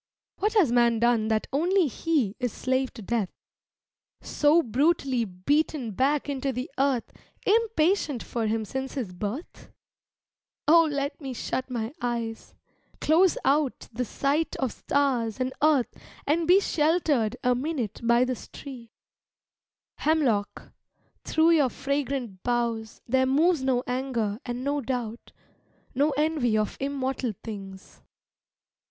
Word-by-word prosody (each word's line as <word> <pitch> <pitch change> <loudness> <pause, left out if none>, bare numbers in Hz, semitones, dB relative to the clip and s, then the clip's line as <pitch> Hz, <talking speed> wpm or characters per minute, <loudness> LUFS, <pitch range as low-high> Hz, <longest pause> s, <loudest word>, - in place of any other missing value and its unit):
What 420 +3 +1
has 350 - +4
man 235 -1 +4
done 230 -1 +2
that 220 -1 +1
only 355 +6 +3
he 275 - 0
Is 250 -2 -1
slave 260 +2 -1
to 225 - -9
death 215 -2 -1 0.9
so 310 +3 +3
brutally 265 -1 +1
Beaten 245 - 0
back 275 +8 +1
into 275 -1 -2
the 250 +1 -5
earth 270 -3 +1 0.3
Impatient 390 - +2
for 230 -2 -2
him 220 0 -1
since 265 +4 -4
his 230 -10 -4
birth? 210 - -6 1.0
Oh 330 +1 +6
let 280 +2 -3
me 270 -2 -5
shut 255 +3 -3
my 235 0 -3
eyes, 235 -2 -4 0.4
close 340 +4 +4
out 280 -1 +1
The 250 +3 -1
sight 280 +6 -1
of 265 -4 -1
stars 255 -6 0
and 255 0 -1
earth 295 -5 +3 0.3
and 320 +3 +1
be 365 +3 +7
Sheltered 300 - +1
a 250 - +4
minute 255 -4 -3
by 235 +1 +4
this 255 -2 -5
tree. 250 -5 -10 1.1
Hemlock, 265 -10 0 0.5
through 320 +1 +3
your 295 -6 +4
fragrant 270 -7 -3
boughs 235 -2 -2
There 260 +2 +2
moves 310 +4 +3
no 260 -2 +1
anger 245 -5 -2
and 245 +1 -4
no 285 +1 0
doubt, 240 -2 -4 0.6
No 285 +4 +2
envy 295 -7 +1
of 215 -1 -1
immortal 270 -3 -2
things. 195 -3 -9
260 Hz, 130 wpm, -26 LUFS, 235-295 Hz, 1.1 s, be